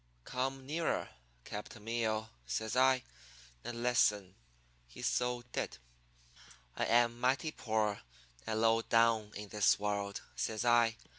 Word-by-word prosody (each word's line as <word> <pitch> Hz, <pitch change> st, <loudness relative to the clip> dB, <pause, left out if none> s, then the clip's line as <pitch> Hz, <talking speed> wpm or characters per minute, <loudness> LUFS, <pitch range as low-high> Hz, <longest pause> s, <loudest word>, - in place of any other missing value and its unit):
"'Come 130 Hz, -, -3 dB
nearer, 160 Hz, +4 st, -1 dB, 0.3 s
capitan 105 Hz, -, -8 dB
meeo,' 110 Hz, -1 st, -1 dB, 0.2 s
says 105 Hz, -, -2 dB
I, 130 Hz, 0 st, +4 dB, 0.6 s
'and 120 Hz, 0 st, -5 dB
listen.' 105 Hz, -6 st, +2 dB, 0.5 s
He -, -, -11 dB
so 125 Hz, 0 st, 0 dB
did. -, -, -3 dB, 1.0 s
"'I -, -, 0 dB
am 120 Hz, 0 st, +3 dB
mighty 135 Hz, +5 st, +1 dB
poor 110 Hz, -6 st, -1 dB, 0.5 s
and 110 Hz, 0 st, 0 dB
low 115 Hz, 0 st, +4 dB
down 115 Hz, -2 st, +3 dB
in 105 Hz, 0 st, -7 dB
the 105 Hz, 0 st, -4 dB
world,' 100 Hz, -1 st, -2 dB
says 110 Hz, +1 st, -2 dB
I. 120 Hz, -1 st, +4 dB
115 Hz, 125 wpm, -34 LUFS, 105-125 Hz, 1.0 s, I